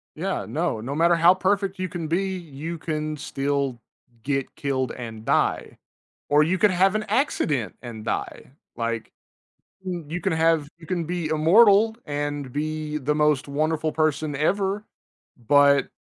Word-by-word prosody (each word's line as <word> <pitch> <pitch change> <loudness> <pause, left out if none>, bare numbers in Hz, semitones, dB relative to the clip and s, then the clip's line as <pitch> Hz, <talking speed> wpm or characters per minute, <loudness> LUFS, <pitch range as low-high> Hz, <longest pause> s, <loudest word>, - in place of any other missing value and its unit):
Yeah, - - -3
no, 110 - -1
no 130 +6 -4
matter 170 +3 +4
how 170 +2 +6
perfect 195 +1 0
you 185 0 -2
can 170 -3 -5
be, 175 +5 +1
you 165 0 -7
can 155 -1 -3
still 140 -3 -2 0.4
get 135 +1 -2
killed 130 -3 -1
and 115 -3 -8
die, - - 0 0.5
or 145 +1 +5
you 175 +5 +1
could 210 +1 +4
have 185 +2 +3
an 215 0 -1
accident 160 - 0
and 115 -3 -8
die, 120 - -4 0.2
like, 115 -1 -3 0.8
you 175 -1 -4
can - - 0
have 160 -2 +2
you 165 - -13
can 175 -2 -2
be 170 -1 -3
immortal 200 +8 +5
and 145 -2 -3
be 155 +1 -3
the 150 +1 0
most 150 -2 +2
wonderful 155 +2 0
person 155 -1 0
ever, 195 +6 0 0.6
but 140 -1 +5
155 Hz, 150 wpm, -24 LUFS, 140-175 Hz, 0.8 s, how